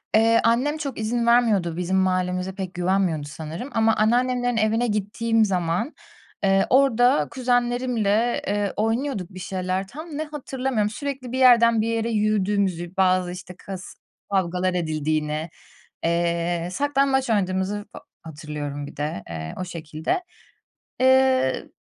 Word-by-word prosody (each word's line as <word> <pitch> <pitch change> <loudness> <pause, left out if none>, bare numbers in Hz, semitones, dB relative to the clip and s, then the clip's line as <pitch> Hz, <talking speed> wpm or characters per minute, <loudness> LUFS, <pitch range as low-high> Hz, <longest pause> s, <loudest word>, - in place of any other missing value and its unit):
eee, 230 +1 +5
annem 255 +7 +2
çok 280 -7 -5
izin 235 +2 -1
vermiyordu 210 -9 +3
bizim 180 +2 0
mahallemize 185 0 0
pek 190 -2 -5
güvenmiyordu 175 -4 0
sanırım 160 - -7
ama 225 0 +3
anneannemlerin 245 +2 +1
evine 225 +2 +2
gittiğim 220 +2 +1
zaman, 185 - -1 0.5
eee, 195 0 +3
orada 245 - +4
kuzenlerimle, 245 -3 +1
eee, 205 -1 0
oynuyorduk 225 -3 -1
bir 185 - -8
şeyler 185 0 -3
tam 305 - -8
ne 310 - -1
hatırlamıyorum. 265 -7 -2
Sürekli 270 0 -5
bir 260 - -2
yerden 235 -3 +6
bir 220 - -1
yere 230 0 -1
yürüdüğümüzü, 200 -4 0
bazı, 185 -1 +2
işte, 180 0 -9
kas 190 -2 -8 0.4
kavgalar 185 -1 0
edildiğini, 155 -1 -1 0.5
eee, 170 0 0
saklambaç 275 +1 +1
oynadığımızı 200 0 0
fa - - -9 0.2
hatırlıyorum 150 -2 -6
bir - - -12
de, 145 -9 -3
eee, 80 -1 -5
o 185 - -2
şekilde. 165 - -3 0.8
Eee, 260 0 +3
205 Hz, 130 wpm, -23 LUFS, 180-245 Hz, 0.8 s, yerden